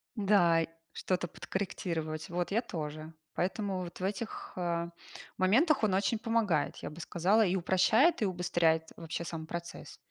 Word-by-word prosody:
Да 190 Hz, -6 st, +4 dB
и, -, -, -2 dB, 0.2 s
что-то 180 Hz, -1 st, -1 dB
подкорректировать. 160 Hz, -5 st, -4 dB
Вот, 175 Hz, +1 st, -2 dB
я 225 Hz, +4 st, +2 dB
тоже. 155 Hz, -4 st, -6 dB, 0.2 s
Поэтому 190 Hz, +1 st, -1 dB
вот 175 Hz, 0 st, -7 dB
в -, -, -5 dB
этих, 210 Hz, +3 st, -4 dB
а, 170 Hz, -1 st, -1 dB, 0.5 s
моментах 250 Hz, -, +4 dB
он 200 Hz, -3 st, +3 dB
очень 205 Hz, +3 st, +1 dB
помогает, 220 Hz, -9 st, +1 dB
я -, -, -6 dB
бы 155 Hz, -, -11 dB
сказала, 190 Hz, +7 st, +3 dB
и 185 Hz, +1 st, +1 dB
упрощает, 215 Hz, -, +4 dB
и -, -, +3 dB
убыстряет 175 Hz, -3 st, +1 dB
вообще 165 Hz, 0 st, -5 dB
сам 165 Hz, -1 st, -6 dB
процесс. 170 Hz, +1 st, -7 dB
180 Hz, 155 wpm, -31 LUFS, 165-205 Hz, 0.5 s, Да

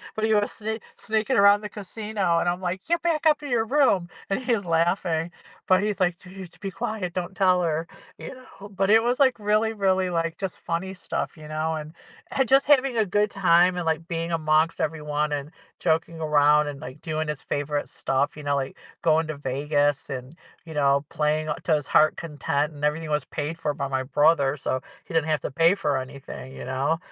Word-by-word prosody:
But, 220 Hz, -, 0 dB
he 220 Hz, -, +2 dB
was 205 Hz, 0 st, +2 dB
sne 220 Hz, +1 st, -4 dB, 0.2 s
sneaking 220 Hz, +4 st, 0 dB
around 200 Hz, +1 st, +6 dB
the 210 Hz, -, -6 dB
casino, 205 Hz, -3 st, -2 dB
and -, -, -1 dB
I'm 175 Hz, +1 st, -2 dB
like, 185 Hz, +1 st, -2 dB
"Get 340 Hz, 0 st, +1 dB
back 330 Hz, -2 st, 0 dB
up 305 Hz, -1 st, +4 dB
to 290 Hz, -, -7 dB
your 235 Hz, -4 st, +1 dB
room!" 225 Hz, -10 st, +3 dB, 0.2 s
And, 195 Hz, -, 0 dB
he's 230 Hz, -5 st, +1 dB
laughing, 165 Hz, 0 st, +1 dB, 0.4 s
but 185 Hz, +1 st, +5 dB
he's 210 Hz, -1 st, -1 dB
like, 180 Hz, 0 st, 0 dB
"You 180 Hz, -, -12 dB
need 180 Hz, -3 st, -8 dB
to -, -, -21 dB
be 195 Hz, -, -4 dB
quiet, 195 Hz, -5 st, -4 dB
don't 180 Hz, 0 st, -4 dB
tell 185 Hz, -1 st, +3 dB
her," 165 Hz, 0 st, -1 dB, 0.3 s
you -, -, -7 dB
know. 230 Hz, -5 st, -13 dB
But, 195 Hz, 0 st, -1 dB
it 225 Hz, +1 st, +7 dB
was 245 Hz, +3 st, 0 dB
like 260 Hz, -4 st, +4 dB
really, 215 Hz, +2 st, +1 dB
really, 190 Hz, -3 st, +1 dB
like, 165 Hz, -1 st, -1 dB
just 190 Hz, -2 st, -5 dB
funny 185 Hz, +3 st, -3 dB
stuff, 180 Hz, -, -4 dB
you 155 Hz, -, -11 dB
know, 155 Hz, +1 st, -2 dB
and 155 Hz, +1 st, -7 dB, 0.4 s
and 265 Hz, -2 st, +1 dB
just 270 Hz, +1 st, +5 dB
having 270 Hz, -4 st, +4 dB
a 220 Hz, -, +3 dB
good 205 Hz, +2 st, +1 dB
time, 180 Hz, -1 st, +4 dB
and, 175 Hz, -2 st, -3 dB
like, 160 Hz, +1 st, -1 dB
being 165 Hz, -1 st, -3 dB
amongst 155 Hz, 0 st, +2 dB
everyone, 150 Hz, -1 st, -1 dB
and 145 Hz, 0 st, -3 dB, 0.3 s
joking 165 Hz, 0 st, 0 dB
around, 150 Hz, 0 st, +4 dB
and, 145 Hz, -1 st, -6 dB
like, 150 Hz, -1 st, -9 dB
doing 155 Hz, 0 st, -2 dB
his 150 Hz, -1 st, -4 dB
favorite 145 Hz, 0 st, -2 dB
stuff, 140 Hz, +3 st, -1 dB
you -, -, -7 dB
know, 145 Hz, 0 st, +1 dB
like, 135 Hz, -1 st, -3 dB, 0.3 s
going 160 Hz, -1 st, +3 dB
to 155 Hz, -2 st, -5 dB
Vegas 145 Hz, +3 st, 0 dB
and, 130 Hz, +3 st, -6 dB, 0.3 s
you 160 Hz, -, -9 dB
know, 140 Hz, -1 st, +2 dB
playing 155 Hz, +1 st, 0 dB
a 150 Hz, -, 0 dB
to 165 Hz, -, +2 dB
his 145 Hz, -1 st, -3 dB
heart 155 Hz, 0 st, +4 dB
content, 150 Hz, -1 st, -2 dB
and 145 Hz, -, -11 dB
everything 155 Hz, +1 st, -1 dB
was 150 Hz, -2 st, 0 dB
paid 155 Hz, +2 st, -4 dB
for 150 Hz, -3 st, -1 dB
by 140 Hz, -, -3 dB
my 130 Hz, -1 st, -1 dB
brother, 145 Hz, +1 st, +3 dB
so 130 Hz, 0 st, -2 dB, 0.3 s
he 185 Hz, -, -10 dB
didn't 160 Hz, -1 st, +2 dB
have 155 Hz, -, +1 dB
to -, -, -4 dB
pay 165 Hz, +6 st, +4 dB
for 150 Hz, -8 st, 0 dB
anything, 130 Hz, 0 st, -8 dB
you -, -, -7 dB
know? 135 Hz, +5 st, 0 dB
165 Hz, 220 wpm, -25 LUFS, 150-200 Hz, 0.4 s, it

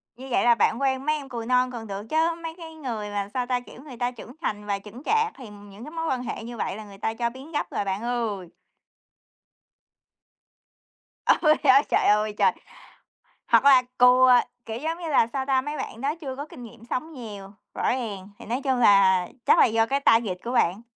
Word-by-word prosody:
Như 260 Hz, +3 st, -10 dB
vậy -, -, +2 dB
là 240 Hz, -1 st, +6 dB
bạn 230 Hz, +2 st, +1 dB
quen 265 Hz, 0 st, 0 dB
mấy 305 Hz, 0 st, +2 dB
em 280 Hz, -3 st, -7 dB
cừu 235 Hz, -3 st, -5 dB
non 250 Hz, +1 st, +2 dB
còn 230 Hz, -3 st, -7 dB
được 200 Hz, 0 st, -5 dB
chớ, 325 Hz, +2 st, +2 dB
mấy 325 Hz, 0 st, -5 dB
cái 325 Hz, -2 st, -10 dB
người 235 Hz, -9 st, -5 dB
mà, 205 Hz, -1 st, -3 dB
sao 250 Hz, -1 st, -1 dB
ta, 250 Hz, -1 st, 0 dB
kiểu, 245 Hz, +1 st, -14 dB
người 270 Hz, -5 st, -11 dB
ta 245 Hz, +1 st, -1 dB
trưởng 245 Hz, -1 st, -11 dB
thành 210 Hz, -7 st, -3 dB
và 200 Hz, -1 st, -2 dB
chững 215 Hz, +6 st, -12 dB
chạc 445 Hz, 0 st, +2 dB
thì 250 Hz, -5 st, -11 dB
những 205 Hz, +1 st, -13 dB
cái 300 Hz, -, -9 dB
mối 325 Hz, 0 st, -3 dB
quan 255 Hz, -1 st, -1 dB
hệ 235 Hz, -, -5 dB
như 235 Hz, +1 st, -8 dB
vậy 205 Hz, -, -3 dB
là 215 Hz, -, -8 dB
người 200 Hz, -1 st, -13 dB
ta 220 Hz, +2 st, -2 dB
cho 235 Hz, +1 st, -1 dB
biến 265 Hz, +6 st, -12 dB
gấp 295 Hz, -, -2 dB
rồi -, -, -1 dB
bạn 195 Hz, +1 st, -2 dB
ơi! 230 Hz, -6 st, -2 dB, 2.8 s
Ôi, 305 Hz, -2 st, +4 dB
á, 270 Hz, 0 st, +7 dB
trời -, -, +2 dB
ơi, 210 Hz, 0 st, +3 dB
trời! -, -, +4 dB, 1.0 s
Hoặc -, -, +5 dB
là 270 Hz, -2 st, +7 dB, 0.2 s
cừu, 250 Hz, +1 st, +6 dB
à, 250 Hz, -1 st, +6 dB, 0.2 s
kiểu 225 Hz, 0 st, -5 dB
giống 325 Hz, +3 st, -3 dB
như 340 Hz, -2 st, -5 dB
là, 280 Hz, -6 st, +4 dB
sao 265 Hz, -1 st, -2 dB
ta, 265 Hz, -1 st, +2 dB
mấy 295 Hz, +3 st, -5 dB
bạn 260 Hz, -4 st, -6 dB
đó 280 Hz, +3 st, -1 dB
chưa 265 Hz, -4 st, -6 dB
có 285 Hz, +2 st, -6 dB
kinh 250 Hz, -, -12 dB
nghiệm 230 Hz, 0 st, -13 dB
sống 315 Hz, +6 st, -3 dB
nhiều, 205 Hz, -7 st, -9 dB, 0.2 s
rõ -, -, -4 dB
ràng, 210 Hz, -6 st, -4 dB
thì -, -, -12 dB
nói 240 Hz, +5 st, -2 dB
chung 265 Hz, -2 st, +1 dB
là 195 Hz, -4 st, +5 dB, 0.2 s
chắc -, -, +5 dB
là -, -, +7 dB
do 225 Hz, -1 st, +2 dB
cái 275 Hz, +3 st, 0 dB
target 225 Hz, -8 st, +3 dB
của 240 Hz, -, -3 dB
bạn. 195 Hz, -2 st, +1 dB
245 Hz, 230 wpm, -25 LUFS, 210-275 Hz, 2.8 s, á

